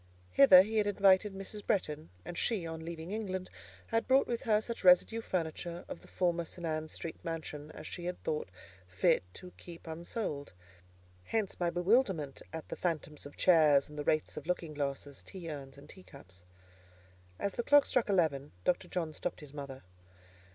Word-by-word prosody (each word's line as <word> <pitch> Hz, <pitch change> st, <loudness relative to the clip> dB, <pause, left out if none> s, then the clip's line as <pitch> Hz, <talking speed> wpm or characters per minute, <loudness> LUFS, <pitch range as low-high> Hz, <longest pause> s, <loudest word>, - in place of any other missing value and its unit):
Hither 160 Hz, -, +9 dB
he 220 Hz, +2 st, -3 dB
had 210 Hz, -1 st, +3 dB
invited 200 Hz, 0 st, +4 dB
Mrs. 200 Hz, +2 st, -7 dB
Bretton, 155 Hz, -5 st, -1 dB, 0.2 s
and 175 Hz, -, -6 dB
she, 200 Hz, -2 st, 0 dB
on 160 Hz, 0 st, -6 dB
leaving 165 Hz, +1 st, -6 dB
England, 190 Hz, -4 st, -3 dB, 0.3 s
had 225 Hz, 0 st, 0 dB
brought 265 Hz, +1 st, +5 dB
with 235 Hz, -1 st, -2 dB
her 215 Hz, -4 st, +3 dB
such 230 Hz, 0 st, -6 dB
residue 185 Hz, +5 st, +5 dB
furniture 170 Hz, -2 st, -3 dB
of -, -, -7 dB
the -, -, -16 dB
former 175 Hz, -2 st, 0 dB
St. 175 Hz, +1 st, -7 dB
Ann's 155 Hz, -1 st, -2 dB
Street 165 Hz, -, -7 dB
mansion 155 Hz, -2 st, -5 dB
as -, -, -9 dB
she 175 Hz, -, -7 dB
had 180 Hz, 0 st, -3 dB
thought 150 Hz, -, -2 dB, 0.4 s
fit 90 Hz, 0 st, +3 dB
to 180 Hz, -, -10 dB
keep 170 Hz, -1 st, -11 dB
unsold. 160 Hz, -, -4 dB, 0.7 s
Hence 220 Hz, -4 st, -2 dB
my 175 Hz, -1 st, +2 dB
bewilderment 175 Hz, -, +1 dB
at 160 Hz, 0 st, -6 dB
the -, -, -5 dB
phantoms 155 Hz, -4 st, -3 dB
of 145 Hz, -, -15 dB
chairs, 150 Hz, -6 st, +5 dB
and 150 Hz, 0 st, -8 dB
the -, -, -2 dB
wraiths 155 Hz, +1 st, 0 dB
of 150 Hz, -, -7 dB
looking 175 Hz, -3 st, -2 dB
glasses, 140 Hz, -1 st, -4 dB
tea 175 Hz, -4 st, -8 dB
urns, 140 Hz, -2 st, -8 dB
and 140 Hz, -, -13 dB
teacups. 115 Hz, -, -14 dB, 0.9 s
As 200 Hz, -, -2 dB
the -, -, -1 dB
clock 290 Hz, +3 st, +6 dB
struck 245 Hz, -4 st, +1 dB
eleven, 155 Hz, -, +1 dB
Dr. 175 Hz, -, +1 dB
John 165 Hz, -4 st, -3 dB
stopped 175 Hz, +1 st, -4 dB
his 145 Hz, -2 st, -11 dB
mother. 140 Hz, -2 st, -7 dB
170 Hz, 180 wpm, -32 LUFS, 150-190 Hz, 0.9 s, Hither